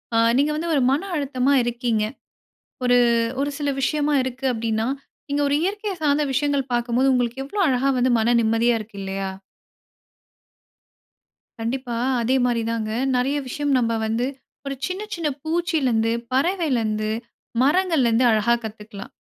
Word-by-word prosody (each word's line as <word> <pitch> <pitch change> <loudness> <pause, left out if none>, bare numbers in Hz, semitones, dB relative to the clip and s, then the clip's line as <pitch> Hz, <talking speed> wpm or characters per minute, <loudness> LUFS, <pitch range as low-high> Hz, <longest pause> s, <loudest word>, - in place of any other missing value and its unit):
ஆ - - +4 0.2
நீங்க 290 +2 +2
வந்து 335 +2 -3
ஒரு 275 - +3
மன 285 +5 +1
அழுத்தமா 275 -1 +1
இருக்கீங்க. 235 -2 -1 0.8
ஒரு, 245 0 +4 0.4
ஒரு 285 - 0
சில 290 -1 -1
விஷயமா 295 +1 +1
இருக்கு 260 +1 -5
அப்படின்னா, 225 0 -1 0.4
நீங்க 285 +1 0
ஒரு 280 - +2
இயற்கைய 405 +2 -2
சார்ந்த 295 0 +2
விஷயங்கள் 280 -1 0
பாக்கும்போது, 240 +2 +2
உங்களுக்கு 245 +1 0
எவ்ளோ 400 +8 -2
அழகா 265 +1 +2
வந்து 250 0 +3
மன 235 +2 +3
நிம்மதியா 230 +2 +2
இருக்கு 215 -1 -10
இல்லையா! 195 0 -3 2.3
கண்டிப்பா, 240 +1 -3 0.3
அதே 250 +3 +1
மாரி 235 -2 +1
தாங்க 220 -2 -2 0.3
நெறைய 270 +4 +1
விஷயம் 290 +2 -2
நம்ப 230 -2 +1
வந்து 225 +3 0 0.4
ஒரு 275 - -3
சின்ன, 370 +3 -4
சின்ன 330 -3 -2 0.2
பூச்சியிலருந்து, 310 -9 +1 0.2
பறவயிலருந்து, 255 - 0 0.5
மரங்கள்லருந்து 275 -6 +3
அழகா 220 +2 +3
கத்துக்கலாம். 210 -1 -8
255 Hz, 135 wpm, -23 LUFS, 230-290 Hz, 2.3 s, ஆ